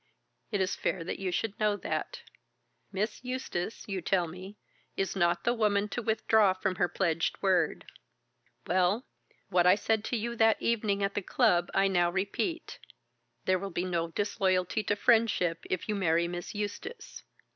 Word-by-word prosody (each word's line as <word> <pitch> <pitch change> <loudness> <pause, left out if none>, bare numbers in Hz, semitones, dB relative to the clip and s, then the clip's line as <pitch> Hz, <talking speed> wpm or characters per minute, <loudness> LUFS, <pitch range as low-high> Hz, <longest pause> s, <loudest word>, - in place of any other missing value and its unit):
It 205 -3 0
is 190 +1 0
fair 180 - -2
that 165 - -4
you 190 -2 -2
should 210 +3 -2
know 210 -1 +2
that. 470 - -4 0.7
Miss 210 +4 -2
Eustace, 250 -6 -4
you 195 -2 -3
tell 175 +1 +1
me, 185 +5 -10 0.4
is 195 -1 -1
not 175 -2 +2
the 240 - +2
woman 210 -3 +1
to 245 - -3
withdraw 220 -2 +3
from 185 -1 -2
her 180 - +2
pledged 170 -2 0
word. 180 -5 +2 0.8
Well, 185 - +2 0.4
what 180 0 +3
I 180 - +7
said 220 0 0
to 245 - -1
you 235 +2 -3
that 225 0 +4
evening 210 -3 0
at 195 0 0
the 205 - -1
club 175 -1 +2
I 195 0 +4
now 175 -2 +2
repeat. 200 - -2 0.7
There 185 0 +2
will 195 +1 -4
be 175 0 -2
no 170 -2 -1
disloyalty 190 +1 0
to 205 - +1
friendship 205 -7 +2
if 185 - -2
you 215 - 0
marry 170 -4 +2
Miss 175 +3 -6
Eustace." 210 - -6
195 Hz, 165 wpm, -30 LUFS, 180-215 Hz, 0.8 s, I